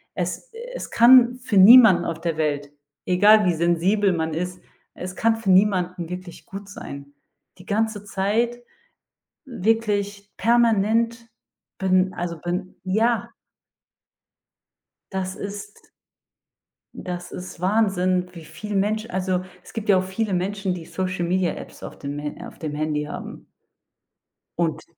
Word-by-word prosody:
es - - -4 0.2
es - - -6
kann 245 +1 +6
für 215 -5 -1
niemanden 195 -3 +8
auf 165 -1 -3
der 165 -2 -2
Welt, 145 -2 -1 0.3
egal 205 +3 +5
wie 175 - +3
sensibel 175 +4 +2
man 160 -1 -2
ist, 180 +2 -4 0.4
es 185 0 -7
kann 225 +2 +2
für 205 -4 0
niemanden 185 -3 +2
wirklich 180 -1 -8
gut 195 +1 -9
sein. 140 -6 -9 0.5
Die 180 - -14
ganze 215 0 -1
Zeit 215 +5 -1 0.8
wirklich 205 -3 -1
permanent 230 0 +2 0.5
ben 185 -1 +2
also, 170 -1 -4
ben 180 +3 -4
ja. 220 +5 +1 1.8
Das 190 -1 -3
ist 205 +1 -8 1.1
das 180 -1 -6
ist 180 -2 -8
Wahnsinn, 185 -2 +1
wie 165 -3 -11
viel 205 +7 -7
Mensch 215 +3 0
also, 185 -2 -1 0.2
es - - -15
gibt 225 -2 -5
ja 195 - +6
auch 185 - +1
viele 190 +2 -2
Menschen, 190 +1 -1
die 170 -2 -7
Social-Media-Apps 185 0 -2
auf - - -8
dem 140 0 -5
Ha 150 0 -6
auf - - -14
dem 155 -2 -4
Handy 150 0 -1
haben. 150 - -8 1.1
Und 165 -2 -1
190 Hz, 130 wpm, -23 LUFS, 175-210 Hz, 1.8 s, niemanden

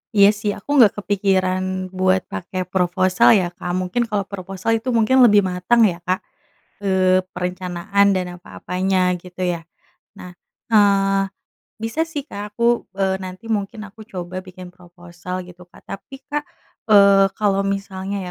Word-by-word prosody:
Iya 200 -1 +7
sih 210 -1 -1
aku 205 - -15
gak 210 - +4
kepikiran 185 -2 0
buat 185 0 +1
pake 185 +1 -4
proposal 185 +3 +3
ya 180 -3 +1
Kak 175 0 -6
mungkin 185 +5 -1
kalau 210 -2 -1
proposal 195 +2 -4
itu 240 - -13
mungkin 230 +4 +3
lebih 205 -3 +5
matang 185 +6 +2
ya 180 -5 +2
Kak, 185 +1 +1 0.6
eee, 185 -1 +3
perencanaan 180 +2 -1
dan 185 -1 -1 0.2
apa-apanya 185 +2 -2 0.2
gitu 180 0 -10
ya 170 - -6 0.6
nah, 180 -2 -10 0.4
eee, 195 -3 +3 0.6
bisa 225 +7 -3
sih 290 -4 -5
Kak 210 -6 -8
aku, 235 0 +1
eee, 190 -1 0
nanti 185 +3 -8
mungkin 210 +1 -3
aku 220 - -18
coba 185 -1 -6
bikin 185 -1 -12
proposal 175 0 -9
gitu 180 0 -15
Kak - - -19
tapi 265 +7 -9
Kak, 295 0 -3 0.5
eee, 200 -2 +6
kalau 200 -2 +1
misalnya 195 0 -3
190 Hz, 145 wpm, -20 LUFS, 185-205 Hz, 0.6 s, Iya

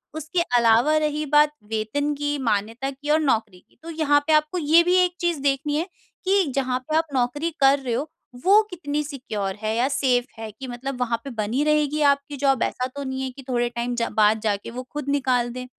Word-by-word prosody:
उसके 315 +3 -1 0.2
अलावा 235 +6 +4
रही 305 0 -1
बात 295 +1 +4 0.2
वेतन 225 +7 -1
की, 290 0 -2
मान्यता 230 +2 -1
की 280 +2 -9
और 310 - +4
नौकरी 220 -9 0
की, - - -31
तो 330 - -8
यहाँ 305 -3 +3
पे 315 - +3
आपको 305 +3 +2
ये 320 +2 +5
भी 355 +1 +2
एक 355 - -4
चीज़ 345 -3 0
देखनी 285 +1 0
है 330 +4 -1 0.4
कि 385 0 +3
जहाँ 260 -2 0
पे 310 - 0
आप 325 - +2
नौकरी 260 +6 0
कर 275 +1 +5
रहे 255 -3 -3
हो 280 +6 -2 0.4
वो 405 +3 +7
कितनी 300 -5 -3
सिक्योर 215 -9 -4
है 215 +1 0
या 245 +2 +2
सेफ 260 -3 +1
है 225 -1 -6
कि 260 +5 -9
मतलब 250 +2 -6
वहाँ 235 -1 0
पर 275 - -5
बनी 220 +7 0
रहेगी 300 0 +1
आपकी 280 +1 -4
जॉब 270 -3 +3
ऐसा 255 - -2
तो 285 - -4
नहीं 265 0 -4
है 265 - -2
कि 270 +1 -12
थोड़े 240 -1 +1
टाइम 240 +1 -3
जा 235 -1 -1
बाद 215 +1 +4
जाके 205 0 -2
वो 250 +2 -6
खुद 295 -1 -4
निकाल 255 -4 +1
दें। 250 0 -6
275 Hz, 220 wpm, -23 LUFS, 240-300 Hz, 0.4 s, वो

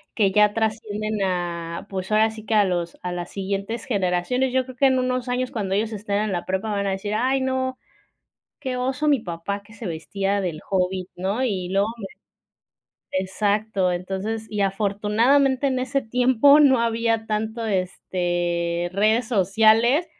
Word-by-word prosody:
que 200 -4 +3
ya 210 0 +5
trascienden 215 -1 -2
a, 170 -2 -3
pues, 190 +1 -5
ahora 215 +1 +4
sí 220 -1 -10
que 220 - -2
a 210 -2 +5
los 175 -2 -2
a 180 0 -3
las 175 0 -5
siguientes 200 +3 -3
generaciones. 205 +4 0
Yo 260 0 +1
creo 255 0 -10
que 275 +2 +4
en 260 -1 +2
unos 255 0 -1
años 250 +1 -1
cuando 195 -4 -2
ellos 220 +2 -1
estén 205 -1 -2
en 215 - -2
la 175 - -3
prepa 190 +4 -2
van 200 -1 -1
a - - 0
decir: 195 +2 -3
"Ay 260 +4 +1
no, 260 0 -1 0.8
qué 255 -1 -3
oso 265 +4 -1
mi 285 -3 +4
papá 190 +2 -5
que 215 +2 -17
se 225 -4 -7
vestía 195 +5 -2
del 175 -5 -3
hobbit", 185 -1 0
¿no?, 195 +7 -1
y 190 -7 -1
luego 195 +2 +2
me 210 - -7 1.1
exacto. 200 0 0
Entonces, 190 +5 -3
y 210 -1 -3
afortunadamente 215 +8 +2
en 260 -2 0
ese 275 +2 0
tiempo 250 +4 +4
no 265 -3 +6
había 230 -1 0
tanto 220 +2 -2
este, 175 -3 -1
redes 215 +4 +2
sociales, 225 - +3
210 Hz, 170 wpm, -23 LUFS, 190-240 Hz, 1.1 s, no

